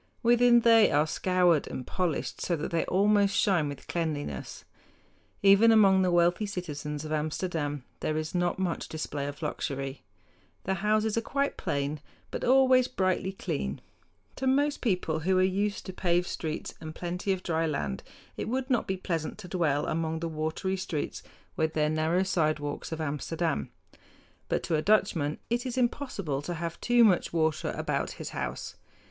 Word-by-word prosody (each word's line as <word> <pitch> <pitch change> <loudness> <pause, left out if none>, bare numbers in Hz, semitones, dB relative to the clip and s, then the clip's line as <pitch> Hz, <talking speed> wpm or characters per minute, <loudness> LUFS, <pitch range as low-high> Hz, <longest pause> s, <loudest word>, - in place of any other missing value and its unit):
Within 240 0 +5
they 230 -2 +6
are 150 +1 +3
scoured 175 -1 +2
and 125 - -6
polished 180 -5 -2
so 175 - 0
that 155 - -4
they 165 -1 +1
almost 200 +1 +3
shine 175 -7 +2
with 140 - -8
cleanliness. 150 - -4 0.8
Even 200 +3 +7
among 195 -4 +6
the 185 - +2
wealthy 175 +4 +3
citizens 150 -6 -5
of 155 - -6
Amsterdam 150 -2 -2 0.2
there 155 - -1
is 155 0 -3
not 175 -1 0
much 185 -3 -2
display 145 -2 -4
of 145 +3 -7
luxury. 135 -2 -3 0.6
The 190 - 0
houses 215 +2 +1
are - - -4
quite 280 +4 -1
plain, 140 +1 -2 0.3
but - - -4
always 255 0 +5
brightly 185 -4 0
clean. 70 - -3 0.6
To 265 - -2
most 285 +2 +2
people 180 -8 0
who 185 +4 +1
are 185 - +4
used 200 +2 0
to 185 - -6
paved 175 -1 +1
streets 160 -3 -4
and 155 0 -7
plenty 180 +3 -2
of 185 -1 -2
dry 165 -1 0
land 70 - -2 0.4
it - - -3
would 260 +2 -2
not 245 - +1
be 190 - -1
pleasant 165 -4 -3
to 210 -4 -9
dwell 165 -6 0
among 160 0 -1
the 165 - -2
watery 160 +4 -2
streets 160 -5 -3 0.3
with 160 -3 0
their 150 -1 +2
narrow 160 +4 +1
sidewalks 155 -6 -1
of 160 - -4
Amsterdam; 155 - -2 0.8
but - - 0
to 165 - 0
a 155 - +1
Dutchman 170 -7 +2
it 240 +1 +1
is 255 -1 -4
impossible 235 - -1
to 175 +4 -4
have 165 0 -5
too 240 0 +5
much 195 -6 +3
water 160 -2 0
about - - -1
his - - -7
house. - - -5
175 Hz, 170 wpm, -28 LUFS, 155-200 Hz, 0.8 s, Even